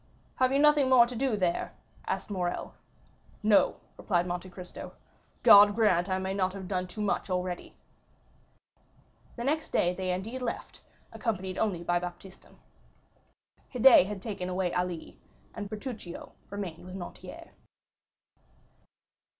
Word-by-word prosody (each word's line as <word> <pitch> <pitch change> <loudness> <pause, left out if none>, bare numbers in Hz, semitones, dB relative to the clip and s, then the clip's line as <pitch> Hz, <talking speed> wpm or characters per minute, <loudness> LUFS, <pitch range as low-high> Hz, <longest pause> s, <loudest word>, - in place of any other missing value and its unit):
"Have 255 0 +3
you 275 - +3
nothing 295 -2 +5
more 250 -2 +7
to 245 +1 -7
do 250 -2 0
there?" 180 -3 -1 0.3
asked - - -3
Morrel. 180 -3 -3 0.7
"No," 210 -1 +4 0.2
replied 175 -4 0
Monte 180 +1 -4
Cristo; 180 0 -9 0.5
"God 205 0 +8
grant 200 -5 +3
I 185 - +1
may 190 0 -2
not 190 -1 0
have 195 -2 -7
done 185 -1 -2
too 210 +4 -7
much 205 -1 -1
already." 180 -1 -3 1.6
The 235 - -5
next 310 +4 -1
day 175 0 +2
they 185 0 -2
indeed 220 +8 -4
left, 240 -2 -5 0.3
accompanied 190 -5 -3
only 190 -6 0
by 175 0 +1
Baptistin. 180 +2 -10 1.2
Haydée 245 -6 +7
had 200 -2 -6
taken 195 -5 -4
away 180 -1 -1
Ali, 180 -2 -3 0.3
and 205 -2 -6
Bertuccio 215 -5 -7 0.2
remained 190 -5 -6
with 185 +1 -9
Noirtier. 180 -2 -9
190 Hz, 135 wpm, -29 LUFS, 180-220 Hz, 1.6 s, God